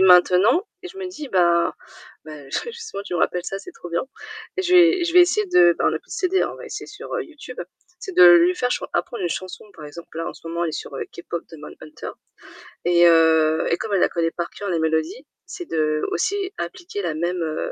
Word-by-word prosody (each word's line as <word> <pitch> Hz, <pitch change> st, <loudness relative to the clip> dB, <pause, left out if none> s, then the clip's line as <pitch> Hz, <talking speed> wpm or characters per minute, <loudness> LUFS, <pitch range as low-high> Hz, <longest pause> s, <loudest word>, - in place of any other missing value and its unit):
maintenant 190 Hz, -, +5 dB, 0.2 s
et 365 Hz, -, -7 dB
je 380 Hz, -, -14 dB
me 375 Hz, -, -4 dB
dis, 305 Hz, -6 st, -8 dB
bah- 170 Hz, -3 st, +2 dB, 0.5 s
bah, 150 Hz, -3 st, -11 dB
ju -, -, -1 dB
justement 450 Hz, -, -7 dB
tu 195 Hz, -, -9 dB
me -, -, 0 dB
rappelles 180 Hz, +1 st, 0 dB
ça, 195 Hz, -, -4 dB
c'est 365 Hz, -, -11 dB
trop 175 Hz, -, -11 dB
bien- 170 Hz, -, 0 dB, 0.5 s
et 380 Hz, -, 0 dB
je 360 Hz, 0 st, -1 dB
vais 350 Hz, 0 st, +6 dB
je 335 Hz, -, -2 dB
vais 360 Hz, -, +8 dB
essayer 415 Hz, +4 st, +3 dB
de- 175 Hz, -, +5 dB
ben -, -, +1 dB
on -, -, +1 dB
n'a -, -, -2 dB
plus -, -, -31 dB
de -, -, -5 dB
CD 375 Hz, 0 st, +1 dB
hein, -, -, -1 dB
on -, -, -11 dB
va -, -, -10 dB
essayer -, -, -7 dB
sur, 420 Hz, +5 st, -8 dB
heu, 465 Hz, -, -1 dB
YouTube- 300 Hz, -, -10 dB, 0.4 s
c'est 380 Hz, -, -7 dB
de 180 Hz, -, +8 dB
lui 175 Hz, +1 st, +5 dB
faire 250 Hz, +3 st, -1 dB
chan -, -, -2 dB
apprendre 235 Hz, -, -2 dB
une 175 Hz, -, 0 dB
chanson. 185 Hz, -1 st, -6 dB
Par 155 Hz, -, -11 dB
exemple, 170 Hz, +2 st, -11 dB
là, 165 Hz, -, -3 dB
en -, -, -6 dB
ce -, -, -14 dB
moment, 170 Hz, +1 st, -2 dB
elle 165 Hz, -, -1 dB
est -, -, -11 dB
sur, 145 Hz, -, -6 dB
heu, -, -, -3 dB
K‑Pop 170 Hz, -1 st, -6 dB
Demon 155 Hz, -2 st, -10 dB
Hunters 155 Hz, -, -9 dB, 0.7 s
et, 175 Hz, 0 st, +5 dB
heu, 160 Hz, -1 st, +4 dB
et 170 Hz, -, +2 dB
comme 215 Hz, -2 st, -4 dB
elle 190 Hz, -, +3 dB
la -, -, +4 dB
connaît 165 Hz, -1 st, -1 dB
par 170 Hz, -1 st, -4 dB
cœur, 205 Hz, -, -6 dB
la 170 Hz, -3 st, 0 dB
mélodie, 160 Hz, -, -1 dB, 0.2 s
c'est 355 Hz, -1 st, -8 dB
d'aussi 155 Hz, -, 0 dB, 0.2 s
appliquer 350 Hz, -, -5 dB
la 170 Hz, -3 st, -1 dB
même, 175 Hz, +2 st, -2 dB
heu, 155 Hz, -1 st, -3 dB
180 Hz, 250 wpm, -22 LUFS, -, 0.7 s, vais